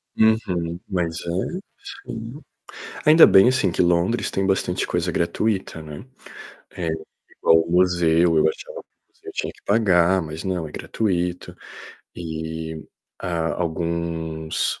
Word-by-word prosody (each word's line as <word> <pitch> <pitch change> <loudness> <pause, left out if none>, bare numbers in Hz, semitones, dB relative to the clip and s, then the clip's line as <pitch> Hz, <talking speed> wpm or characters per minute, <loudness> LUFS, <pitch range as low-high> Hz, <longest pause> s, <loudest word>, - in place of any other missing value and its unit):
Uhum. 90 -6 +1
Mais 85 -3 -2
velho 95 - -3 0.5
Sim. 115 +6 -7 0.7
Ainda 160 +2 +9
bem 95 +5 +7
assim, 115 -8 +2
que - - -2
Londres 90 +6 +2
tem 95 0 -1
bastante 95 -2 0
coisa 90 0 -1
gratuita, 90 0 -1
né. 75 +5 -9 0.7
É, 85 -2 -4 0.5
igual 80 0 +5
o 85 - -8
museu, 85 -2 +3
e - - +5
eu 80 - +4
achava - - -8 0.3
que - - -21
eu - - -5
tinha - - -3
que - - -24
pagar, 95 -4 +3
mas 80 0 -6
não, 90 -4 -2
é - - -11
gratuito. 90 -5 -2 0.6
E, 80 -1 -5 0.4
ah, 85 -3 -2
alguns, 80 -1 -2
85 Hz, 135 wpm, -22 LUFS, 80-95 Hz, 0.7 s, Ainda